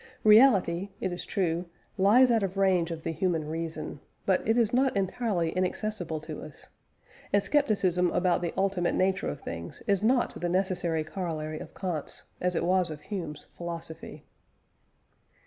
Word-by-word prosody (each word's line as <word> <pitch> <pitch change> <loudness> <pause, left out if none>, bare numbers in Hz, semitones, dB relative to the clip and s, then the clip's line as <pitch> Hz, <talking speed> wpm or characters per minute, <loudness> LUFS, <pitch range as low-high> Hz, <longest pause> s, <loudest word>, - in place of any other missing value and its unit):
Reality, 205 -5 +5
it 185 - -2
is 175 - -5
true, 175 -3 -1 0.3
lies 240 +7 +5
out 225 -2 +3
of 195 -1 -2
range 185 -3 +3
of 165 -1 -6
the - - -2
human 165 -2 -1
reason, 160 -2 -4 0.3
but 190 -2 +3
it 225 - +4
is 230 -2 +2
not 260 -2 +2
entirely 190 -3 0
inaccessible 185 -2 -2
to 155 0 -7
us, 155 -2 -12 0.6
and 200 0 +3
scepticism 190 - +2
about 180 0 +1
the 170 -2 -1
ultimate 190 -2 +1
nature 190 0 +1
of 145 - -6
things 85 0 -7
is 200 -2 +2
not 240 +3 +1
the 175 - 0
necessary 180 -3 0
corollary 155 -3 -4
of - - -10
Kant's, 175 -6 -3 0.2
as 180 0 0
it - - 0
was 185 -1 +2
of 155 -1 -7
Hume's, 165 -7 -6
philosophy. 170 -2 -7
180 Hz, 160 wpm, -28 LUFS, 165-200 Hz, 0.6 s, Reality